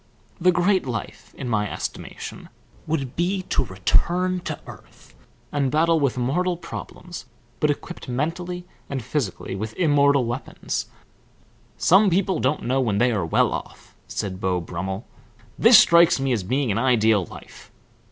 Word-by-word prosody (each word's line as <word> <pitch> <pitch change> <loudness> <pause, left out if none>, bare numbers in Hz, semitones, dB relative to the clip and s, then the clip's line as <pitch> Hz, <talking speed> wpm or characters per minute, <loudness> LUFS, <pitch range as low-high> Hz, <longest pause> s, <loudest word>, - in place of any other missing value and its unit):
The 180 +1 +5
great 180 -1 +2
life 115 -4 -6
in 125 - -5
my 105 -3 0
estimation, - - -6 0.4
would 140 -5 -2
be 185 +3 0
to - - +2
return 175 - +1
to - - -3
earth - - -14 0.4
and 140 -2 +1
battle 160 +3 +3
with 140 -4 0
mortal 175 +9 0
problems, 175 -3 -8 0.3
but 150 - +2
equipped 145 0 -4
mentally 175 +7 -3 0.2
and 135 -4 -3
physically 105 -7 -3
with 110 +3 -5
immortal 140 -5 +3
weapons." 120 +2 -4 0.9
"Some 195 +3 +5
people 190 +1 +1
don't 135 +4 0
know 130 +2 +1
when 110 -5 0
they 125 +3 +3
are 105 -5 0
well 80 - +2
off," - - -8
said 95 -1 -4
Beau 90 -1 +1
Brummel. 95 +5 -5 0.5
"This - - +8
strikes 170 -3 +6
me 135 0 0
as 115 -5 +1
being 125 +5 0
an 100 - 0
ideal 110 -6 +3
life. - - -13
135 Hz, 150 wpm, -23 LUFS, 110-170 Hz, 0.9 s, This